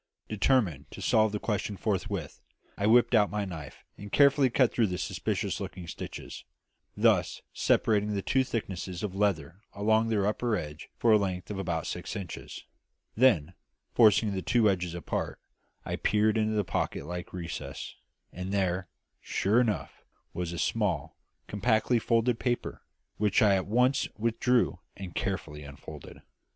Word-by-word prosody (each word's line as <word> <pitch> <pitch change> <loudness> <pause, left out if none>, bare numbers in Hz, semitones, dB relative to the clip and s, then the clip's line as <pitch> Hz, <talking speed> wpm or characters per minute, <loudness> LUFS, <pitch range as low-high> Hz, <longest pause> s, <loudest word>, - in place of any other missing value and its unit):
Determined 100 - +1
to - - -10
solve 110 -1 +3
the 105 - -1
question 105 -2 -2
forthwith, 100 -6 -3 0.3
I 100 - 0
whipped 120 +2 +5
out 105 -3 +5
my 105 -1 -2
knife 80 -7 -8 0.2
and 100 0 -9
carefully 140 -1 +5
cut 125 0 +3
through 115 -3 +3
the 90 -1 -3
suspicious - - -2
looking 90 -1 -6
stitches, - - -7 0.5
thus - - +2
separating 105 -1 +2
the 100 - -2
two 130 0 +2
thicknesses 95 -6 -4
of 100 -3 -2
leather 95 -3 -1
along 110 +2 +2
their 105 -3 +1
upper 110 +2 0
edges 75 -4 -6
for 115 - +3
a 105 - +6
length 95 -1 -3
of 100 - -4
about 85 -4 -2
six - - -5
inches; 95 -5 -7 0.5
then, 100 - +4 0.4
forcing 110 -2 +5
the 95 - -2
two 115 +2 +3
edges 90 -2 -3
apart, 85 - -3 0.5
I - - -3
peered 105 +1 +2
into 110 -1 +1
the 105 - +2
pocket - - -2
like 90 +2 -6
recess; 85 -6 -6 0.4
and 90 +1 -5
there, 95 -2 0 0.3
sure 105 +6 +2
enough, 110 -5 -2 0.3
was 85 0 -3
a 85 - -5
small, - - -1 0.3
compactly 110 +3 +1
folded 115 +1 +1
paper, 120 -1 -2 0.4
which 105 +3 +3
I 100 -2 +5
at 95 -1 0
once 125 +5 +2
withdrew 115 -1 +1 0.2
and 95 -3 -7
carefully 80 -6 -3
unfolded. 70 -1 -11
100 Hz, 155 wpm, -29 LUFS, 90-110 Hz, 0.5 s, a